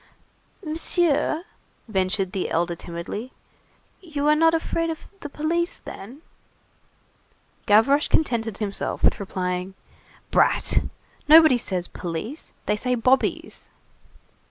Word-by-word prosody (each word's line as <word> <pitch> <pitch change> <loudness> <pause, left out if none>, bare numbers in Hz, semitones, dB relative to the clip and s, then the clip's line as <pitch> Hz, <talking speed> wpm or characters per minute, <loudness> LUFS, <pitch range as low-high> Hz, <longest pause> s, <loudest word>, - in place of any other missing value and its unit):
"Monsieur," 320 0 +2 0.4
ventured 190 -2 -1
the 190 - -3
elder 170 +1 0
timidly, 170 +9 -7 0.7
"you 300 -5 -3
are 300 - +5
not 325 +1 +4
afraid 330 0 -1
of 320 -1 -6
the 295 - -7
police, 335 +4 -1
then?" 250 +11 -11 1.4
Gavroche 250 +8 +4
contented 230 -8 0
himself 200 -2 -3
with - - +3
replying:— 185 -1 -3 0.6
"Brat! - - +3 0.5
Nobody 310 -4 +7
says 180 -5 -3
'police,' 180 - -6
they 210 - +1
say 250 +3 0
'bobbies. 255 +3 0
245 Hz, 105 wpm, -23 LUFS, 190-310 Hz, 1.4 s, Nobody